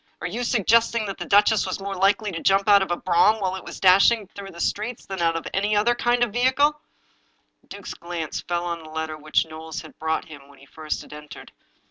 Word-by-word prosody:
Are - - -6
you 220 +8 -3
suggesting 230 0 +2
that 195 -1 -6
the - - -5
duchess 205 0 +4
was 185 - -3
more 195 0 -5
likely 195 +2 +1
to 165 -2 -5
jump 195 +1 +2
out 200 -1 +6
of 190 - -2
a 175 - -1
brougham 195 +4 +3
while 190 -2 -1
it 190 - -8
was - - -9
dashing 200 +4 +5
through 200 -1 -9
the 170 - -12
streets 215 +7 -3
than 190 -2 -5
out 165 -1 +2
of 165 - -4
any 205 +2 +1
other 215 +4 +3
kind 240 0 +1
of 225 -4 -2
vehicle? 285 +5 +2 0.4
" - - -44
The - - -31
duke's - - -8
glance 170 -3 -5
fell 175 0 -3
on 170 -1 -3
the 155 - -12
letter 160 0 -4
which 155 +1 0
Knowles 160 0 -8
had 155 - -15
brought 160 0 -1
him 145 -3 -13
when 140 -1 -18
he 135 - -17
first 155 +2 -5
had - - -14
entered. 150 0 -11
190 Hz, 240 wpm, -23 LUFS, 160-215 Hz, 0.4 s, out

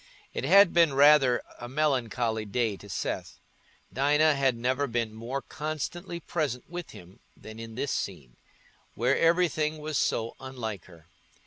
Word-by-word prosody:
It - - -3
had 195 +3 +6
been 165 -5 +4
rather 140 -3 +5 0.2
a 120 - -7
melancholy 125 -6 0
day 110 0 -1
to 100 +1 -14
Seth: - - -4 0.5
Dinah 150 +4 +3
had 135 -3 +1
never 130 +4 0
been 115 -2 -2
more 120 +5 -5
constantly 160 +4 -5
present 150 -7 -3
with 175 0 -7
him 90 +2 -14 0.2
than 110 +1 -11
in 115 -1 -8
this 130 +3 -2
scene, 70 -11 -4 0.6
where 125 +4 +2
everything 165 -2 +2
was 155 -1 -2
so 115 +1 -1
unlike 115 -8 -6
her. 85 -3 -17
130 Hz, 145 wpm, -28 LUFS, 115-155 Hz, 0.6 s, had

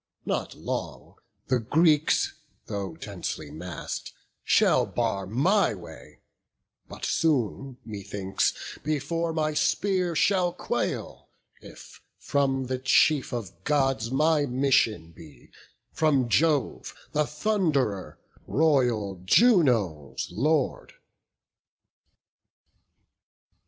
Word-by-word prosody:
not - - -2
long - - -5 0.3
The 130 -1 +1
Greeks, 155 +5 +2 0.3
though 100 -2 -5
densely 75 -2 -6
mass'd, 85 +4 -6 0.3
shall - - +3
bar 105 -5 -2
my 170 - +2
way, 90 - -13 0.7
But - - -6
soon, 135 -4 0
methinks, 100 -2 -3
before 155 +3 -1
my 155 -1 -1
spear 180 +2 0
shall 180 +1 +2
quail, - - -4 0.3
If - - -14 0.2
from 135 -2 0
the 130 0 -3
chief 135 +2 +3
of 95 -7 -6
Gods 135 -5 +1
my 150 +2 +2
mission 120 -10 +1
be, 80 -3 -16 0.4
From 145 -6 +2
Jove 145 +1 +1 0.2
the 150 0 +1
Thund'rer, 150 - -1 0.3
royal 120 - +1
Juno's 115 - +2
Lord." 160 - 0
135 Hz, 90 wpm, -26 LUFS, 105-155 Hz, 0.7 s, shall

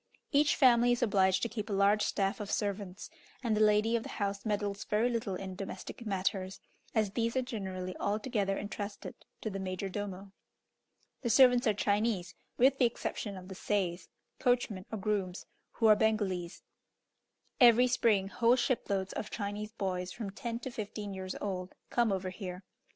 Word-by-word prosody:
Each 290 +1 +4
family 245 -2 +5
is 240 - 0
obliged 190 -4 +3
to - - +2
keep 220 -1 -5
a - - -1
large 200 +2 +4
staff 195 0 0
of 205 -1 -5
servants, 200 +2 -3 0.3
and 225 -3 +1
the 215 - +1
lady 215 +2 +4
of 230 - +1
the - - -8
house 200 0 -3
meddles 205 -1 -1
very 220 +3 +1
little 225 -5 -2
in 190 0 -5
domestic 195 +4 -7
matters, 190 -1 -1 0.4
as 215 -3 +2
these 230 +3 0
are 260 - +2
generally 190 -6 -5
altogether 205 -1 0
entrusted 205 0 -5 0.3
to 220 - -3
the 195 - -4
major 190 +1 -3
domo. 195 0 -5 0.9
The 240 - -1
servants 245 0 +6
are 215 - +3
Chinese, 205 -3 0 0.2
with 270 +2 +4
the 255 - +6
exception 210 -3 -3
of 185 0 -10
the 190 - -7
seis 185 -2 -1 0.3
(coachmen 245 -7 +1
or 220 - -2
grooms), 195 -3 -2 0.3
who 225 - -1
are 215 -1 +8
Bengalese. 205 -5 0 1.0
Every 245 -1 +7
spring, 225 -6 +2
whole 235 +3 +4
shiploads 200 -6 -1
of 210 - -4
Chinese 205 0 -4
boys, 185 -4 -3
from 200 +1 -5
ten 230 +3 -4
to 260 - -5
fifteen 205 -2 -5
years 185 -1 -5
old, 185 -2 -4 0.2
come 235 -3 +2
over 190 -1 -2
here. 185 -1 -7
205 Hz, 170 wpm, -32 LUFS, 190-230 Hz, 1.0 s, are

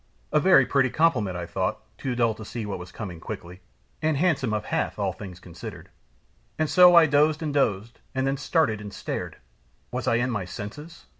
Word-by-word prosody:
"A 150 - +5
very 150 -6 +6
pretty 135 0 +2
compliment!" 110 - +1
I 85 - -4
thought, 85 - -2 0.2
too 130 -3 -2
dull 115 -2 +2
to 110 - -10
see 110 0 -5
what 100 -3 -4
was 90 0 -9
coming 95 -7 -7
quickly, 90 +2 -8 0.4
"and 155 -2 +1
handsome 145 -7 +1
of 105 -2 -2
Hath, - - -1
all - - -1
things 90 -3 -9
considered." 90 0 -10 0.7
And 155 - +1
so 180 +2 +7
I 170 -1 +9
dozed 150 +2 +3
and 150 -2 -2
dozed, 115 -5 0 0.2
and 130 0 0
then 135 +1 0
started, 140 -8 +1
and 105 -1 -7
stared! - - -5 0.5
Was - - -3
I - - +3
in 120 +2 +1
my 105 -5 -2
senses? 125 - -9
120 Hz, 200 wpm, -25 LUFS, 100-150 Hz, 0.7 s, I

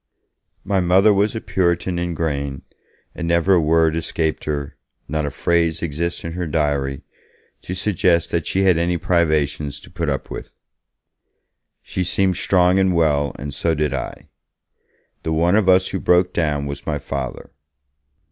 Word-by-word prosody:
My 100 -1 +1
Mother 95 +4 +4
was 100 +3 +1
a - - -1
Puritan 90 -1 0
in 85 -1 -2
grain, 70 -4 -3 0.5
and 85 - -4
never 85 +3 +3
a 90 - +4
word 80 0 +3
escaped 80 -1 -2
her, 75 -2 -3 0.3
not 75 0 -1
a - - -1
phrase 85 +3 0
exists 85 +2 -3
in 85 - -4
her 90 0 -3
diary, 70 -3 -1 0.6
to 90 - -5
suggest 90 -3 +1
that 85 - -1
she 95 - +1
had 90 -4 +4
any 85 +1 +1
privations 75 -4 0
to - - -15
put 85 -3 -2
up 70 -2 -3
with. - - -8 1.3
She 95 - -3
seemed 90 +1 +1
strong 90 0 +3
and 95 -2 +2
well, 75 -4 +1
and 70 +1 -6
so 80 +3 0
did 75 -2 0
I; - - -6 0.9
the 80 - -3
one 85 +4 +3
of 105 -3 +3
us 95 0 +4
who 95 - -3
broke 90 +1 +3
down 75 -4 0
was 70 0 -7
my 75 -2 0
Father. 70 -2 -5
85 Hz, 165 wpm, -21 LUFS, 75-90 Hz, 1.3 s, Mother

